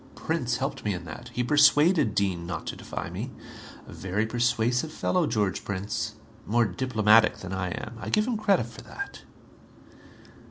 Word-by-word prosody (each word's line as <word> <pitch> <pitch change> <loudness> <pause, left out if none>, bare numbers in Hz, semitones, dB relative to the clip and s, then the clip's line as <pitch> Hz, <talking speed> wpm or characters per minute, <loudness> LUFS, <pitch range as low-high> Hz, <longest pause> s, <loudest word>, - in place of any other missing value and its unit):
Prince 125 -7 -1
helped 135 +1 -3
me 105 -2 0
in 90 -1 -7
that. 120 +7 -8
He 125 - -1
persuaded 145 - +5
Dean 95 -4 0
not 85 -3 -4
to - - -4
defy - - -6
me. - - -4 0.6
A - - -10
very 95 +4 -1
persuasive 120 +4 +1
fellow, 175 +1 +1
George 100 -3 0
Prince. 105 +3 -3 0.3
More 120 +2 +3
diplomatic 110 +1 +4
than 95 0 -7
I 95 -1 -2
am. 110 +5 -6
I - - -5
give 215 0 +2
him 245 -1 -1
credit 205 - +2
for 115 -1 -11
that." 400 0 -7
115 Hz, 165 wpm, -27 LUFS, 100-140 Hz, 0.6 s, persuaded